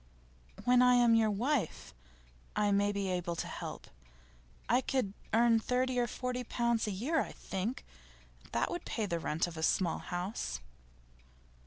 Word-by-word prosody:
'When 250 0 +5
I 250 0 +6
am 240 -1 +5
your 225 -1 +4
wife, 225 - -1 0.6
I 205 -1 +2
may 200 +1 +3
be 200 -1 -2
able 175 -2 -1
to - - -3
help. - - -6 0.8
I 245 +2 +4
could 255 -8 -1 0.2
earn 230 +1 +5
thirty 250 +2 0
or 240 - +2
forty 250 +1 -3
pounds 235 -1 0
a - - -1
year, 270 - 0
I - - -5
think. 200 +7 -4 0.7
That - - 0
would 350 - -4
pay 220 - -2
the 170 -4 -1
rent 160 0 0
of 170 -2 -8
a - - -4
small 170 +1 +2
house. 175 - -3
225 Hz, 160 wpm, -33 LUFS, 190-250 Hz, 0.8 s, I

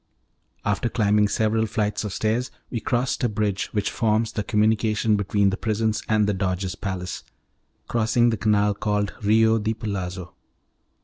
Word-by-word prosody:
After 105 +3 0
climbing 105 -2 +2
several 110 +2 +1
flights 105 0 -1
of 105 - -4
stairs 110 +5 -1 0.2
we 120 - -2
crossed 120 +3 -1
a - - +4
closed 105 - -7
bridge 100 -2 0
which 105 -2 -1
forms 110 0 +1
the 105 - -2
communication 110 0 +2
between 100 0 +1
the 95 - -3
prisons 110 -1 0
and 110 -1 +3
the 105 - +1
Doge's 95 -1 -2
palace, 95 -3 -5 0.6
crossing 120 +1 +2
the - - 0
canal 105 0 +2
called 105 0 -1
Rio 110 +2 +4
di 110 +1 -1
Palazzo. 95 -5 -5
105 Hz, 160 wpm, -24 LUFS, 100-110 Hz, 0.6 s, a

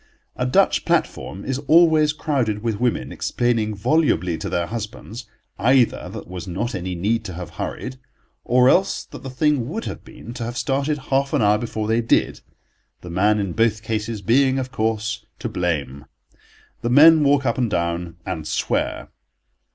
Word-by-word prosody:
A - - -1
Dutch 65 - +3
platform 95 - -1
is 135 0 -2
always 160 -2 +5
crowded 125 -9 -1
with 110 -3 -1
women 125 -1 -1
explaining 115 -3 -1
volubly 100 - +1
to - - -4
their 85 -1 0
husbands 110 +2 -7 0.3
either 130 -1 +2
that - - -10
there - - -7
was 90 +1 -8
not 100 +7 -3
any 90 -1 -4
need 110 +6 0
to 95 - -6
have 90 -1 -7
hurried, 130 0 -5 0.4
or 125 +1 +4
else 190 +8 +3
that - - -11
the 135 - -7
thing 130 -1 +1
would 225 +8 -4
have - - -6
been 115 - -11
to 120 -1 -5
have 120 +2 -5
started 140 +2 0
half 135 +1 +1
an - - +2
hour 105 +1 +4
before 110 -2 -3
they 115 +1 +2
did, 115 - +1 0.6
the 90 - -9
man 105 +4 +2
in 100 -4 -2
both 110 0 +1
cases 110 -1 -3
being, 130 +5 +3
of 130 -1 -3
course, 110 -2 -2
to 120 - -4
blame. 75 - -2 0.8
The 120 - -1
men 155 +4 +7
walk 140 -1 +3
up 115 0 0
and 120 -3 +1
down 85 -2 -2
and 80 -2 -4
swear. - - -2
115 Hz, 175 wpm, -22 LUFS, 100-130 Hz, 0.8 s, men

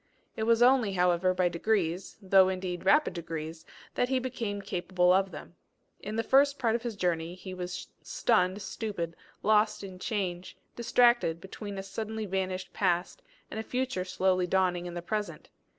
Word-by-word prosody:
It 220 - -2
was 230 0 +5
only, 245 -5 +4
however, 180 0 +3
by 185 -1 +2
degrees, 175 0 -1
though 190 0 +6
indeed 185 -1 -4
rapid 300 +7 +4
degrees, 165 -1 -6 0.3
that 245 - 0
he 265 - +2
became 240 -5 -3
capable 180 -2 +1
of 195 +1 +2
them. 175 - -10 0.5
In 210 +2 -6
the 225 - 0
first 280 +2 +4
part 230 -3 +1
of 235 - 0
his 235 -2 -4
journey 175 -2 -1
he 185 0 -8
was 180 0 -5 0.2
stunned, 195 -3 +1
stupid, 175 -7 -4 0.3
lost 210 0 +3
in 190 -2 -8
change, 185 -4 -3 0.2
distracted 240 -7 +3
between 200 +2 -7
a 195 - -4
suddenly 220 +2 -4
vanished 185 -1 -3
past, 180 -2 0 0.3
and 220 - -4
a - - -3
future 250 -6 -2
slow 185 0 +1
dawning 180 -1 +1
in 175 - -7
the 175 - -5
present. 210 +3 -4
190 Hz, 165 wpm, -29 LUFS, 180-220 Hz, 0.5 s, though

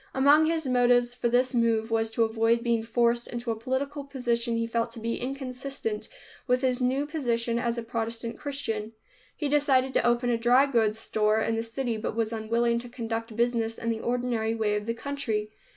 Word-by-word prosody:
Among 290 +4 +5
his 325 -1 0
motives 245 -1 +3
for 245 -1 -1
this 250 +2 +2
move 230 -1 +1
was 225 0 +1
to 225 +1 +1
avoid 225 +1 +2
being 235 -2 +1
forced 235 +1 +1
into 240 -1 -3
a - - -1
political 270 +5 -3
position 240 -4 -1
he 230 0 0
felt 230 0 -1
to 230 - -8
be 230 +1 -2
inconsistent 255 -4 -4 0.4
with 250 0 +2
his 255 0 +1
new 260 +3 +1
position 235 -6 -1
as 235 0 -1
a 235 - -3
Protestant 230 0 -3
Christian. 225 -7 -3 0.4
He 295 - -2
decided 275 -2 +2
to - - +2
open 240 +1 +2
a 235 - +2
dry 245 +4 +5
goods 225 -6 +1
store 215 -1 +1
in 225 0 0
the 225 - 0
city, 230 0 -3
but 215 0 -4
was 225 0 -1
unwilling 235 +1 +1
to 245 +1 -9
conduct 230 -2 -4
business 230 -1 0
in 230 - -2
the 225 - -2
ordinary 235 -2 -1
way 215 -2 0
of 210 +1 -3
the 230 - -1
country. 225 -6 -3
235 Hz, 200 wpm, -27 LUFS, 225-255 Hz, 0.4 s, Among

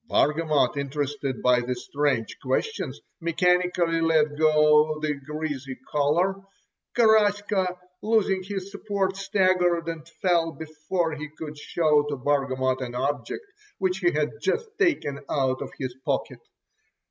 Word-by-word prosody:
Bargamot, 150 -3 +2
interested 140 -1 -3
by 125 -1 +5
the 125 +1 -2
strange 140 -2 -1
questions, 135 - -2 0.2
mechanically 175 0 +2
let 155 -2 +3
go 150 0 +4
the 155 -1 0
greasy 140 -2 -5
collar. 160 +7 +2 0.6
Garaska, 205 -4 +3 0.2
losing 210 -3 +2
his 195 0 -5
support, 200 -2 -1
staggered 185 -4 +2
and 165 -1 -5
fell 170 -3 +2
before 160 +2 -3
he 155 0 -6
could 150 -1 -6
show 150 0 +2
to 145 - -1
Bargamot 130 -1 0
an 125 -1 -5
object 140 - -2 0.3
which 190 -1 0
he 175 -3 +3
had 150 0 0
just 190 - 0
taken 300 - +1
out 130 -2 0
of - - -4
his 130 -3 -4
pocket. - - -2
155 Hz, 125 wpm, -25 LUFS, 145-185 Hz, 0.6 s, by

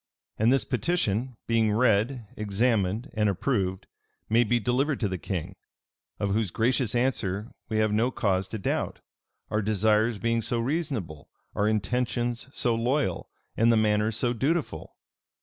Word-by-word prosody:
And 110 +3 +4
this 135 - +2
petition, 125 - -1
being 110 -2 +2
read, 115 +2 +2
examined, 105 +2 0
and 105 -2 +2
approved, 95 -2 -1 0.4
may 115 +2 +5
be 120 +1 +1
delivered 130 +5 0
to 105 - +2
the 95 -2 -4
king; 95 0 -4 0.7
of 100 -1 0
whose 110 -2 0
gracious 120 +3 +1
answer 115 -4 -1 0.2
we 110 - -1
have 110 -1 +2
no 110 +4 +2
cause 95 -6 0
to 110 - -5
doubt, 100 - -2 0.5
our 105 - +1
desires 110 +2 +2
being 115 +3 0
so 115 +2 -1
reasonable, 115 - -3 0.2
our 105 - +1
intentions 120 +3 -1
so 120 -4 +1
loyal, 120 - 0 0.3
and 115 +1 +4
the 115 - +4
manner 105 0 +2
so 120 +2 -1
dutiful. 135 - -2
110 Hz, 150 wpm, -27 LUFS, 105-120 Hz, 0.7 s, may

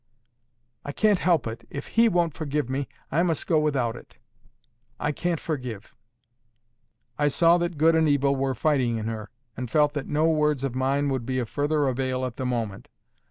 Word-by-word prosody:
"I 145 - -5
can't 210 0 +3
help 170 -8 +2
it. 115 0 -7
If 140 - -7
He 230 0 +4
won't 170 -5 +1
forgive 150 -4 -2
me, 135 0 -2 0.2
I 160 - +2
must 170 -3 0
go 160 -3 +3
without 135 -6 0
it. - - -14 0.8
I 150 - 0
can't 170 +2 -2
forgive." 125 -9 -5 1.3
I 145 - +3
saw 170 +4 +4
that 175 -2 -2
good 160 +2 +4
and 160 -1 +3
evil 140 -1 +2
were 135 -1 -1
fighting 130 -7 +1
in 110 - -4
her, 110 -2 -5 0.3
and 125 -1 -5
felt 150 +1 +3
that 145 -3 -4
no 150 +2 +1
words 150 -3 +1
of 135 -3 -1
mine 135 +2 0
could 130 -3 -2
be 130 -1 -1
of 120 -4 -2
further 145 0 0
avail 130 0 -1
at 125 -2 -6
the 130 - -2
moment. 115 -5 -3
140 Hz, 190 wpm, -25 LUFS, 130-155 Hz, 1.3 s, He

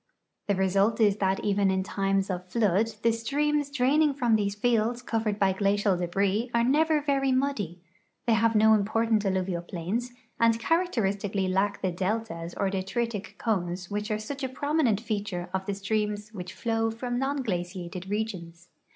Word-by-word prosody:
The 200 - +2
result 195 +4 +2
is 205 -2 +4
that 190 -1 0
even 200 -1 +2
in 190 0 +1
times 195 0 0
of 180 0 -5
flood 210 0 +2 0.2
the 230 - +4
streams 290 +5 0
draining 285 +2 +2
from 240 -5 +2
these 200 -1 0
fields 235 +2 +1
covered 220 -3 -1
b}" 190 -1 +3
glacial 200 0 +2
debris 195 +6 0
are 235 - +4
never 305 +4 +3
very 275 -2 +1
muddy; 255 - -1 0.5
they 235 - +3
have 225 +1 +3
no 220 +1 +6
imi)ortant 220 +1 +1
alluvial 185 -2 -1
j)lains 185 +8 -3 0.3
and 230 0 +4
characteristically 205 - 0
lack 195 +2 0
the 185 - +1
deltas 185 -2 -3
or 195 -1 0
detritic 200 +3 -3
cones 180 -4 -2
which 210 +2 -2
are 215 - 0
such 270 +6 -6
a 265 - -1
prominent 285 -5 +1
feature 205 -6 -4
of 190 0 -2
the 200 - -1
streams 210 +1 -2
which 180 -2 -6
flow 225 -1 0
from 245 +2 -3
non 275 +1 -1
glaciated 180 -2 -4
regions. 180 -5 -4
210 Hz, 165 wpm, -27 LUFS, 190-235 Hz, 0.5 s, no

